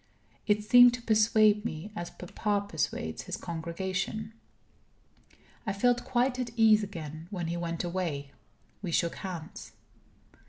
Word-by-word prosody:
It 210 0 +2
seemed 245 +2 +7
to 245 - -10
persuade 215 -1 +4
me 195 -1 -5
as 175 -3 -4
papa 200 +3 -2
persuades - - -2
his - - -5
congregation. 190 +6 -4 1.3
I 195 - 0
felt 245 +4 +2
quite 250 0 +1
at 250 -1 -2
ease 220 -2 +6
again. 160 -5 -7
When 180 -4 -4
he 170 - -2
went 170 0 -3
away, 170 -6 -3 0.5
we 190 - -4
shook 170 +1 +1
hands. 180 -2 -7
200 Hz, 130 wpm, -29 LUFS, 170-220 Hz, 1.3 s, seemed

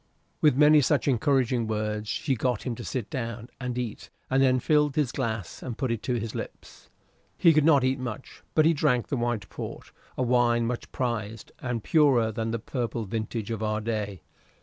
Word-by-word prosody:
With 150 -4 +5
many 150 +1 +7
such 145 0 +1
encouraging 125 -2 +2
words 105 0 -2
she 140 +3 0
got 125 -1 -1
him 125 - -2
to 120 - -7
sit 120 -4 -3
down 115 -2 -5
and 125 -2 -3
eat, 120 -4 -5 0.2
and 135 +1 +3
then 130 -1 +4
filled 150 +1 +2
his 145 -6 +1
glass 110 -8 -3
and 120 -4 -5
put 130 -4 -1
it 115 -2 -2
to 125 - -1
his 115 -1 -3
lips. - - -9 0.5
He 165 -2 +6
could 155 -1 +4
not 145 -5 +5
eat 130 +1 +1
much, 125 0 -7
but 155 - +5
he 165 - +5
drank 140 -6 +1
the - - 0
white 120 -4 -1
port - - -7 0.3
a 130 - +1
wine 120 -1 +3
much 120 +1 -4
prized, 115 -4 -3
and 120 -3 -3
purer 135 -8 +4
than 115 +1 -3
the 115 - -1
purple 115 -1 -3
vintage 110 +1 -4
of 110 -1 -3
our 110 0 0
day. 105 -5 -3
120 Hz, 195 wpm, -27 LUFS, 110-135 Hz, 0.5 s, many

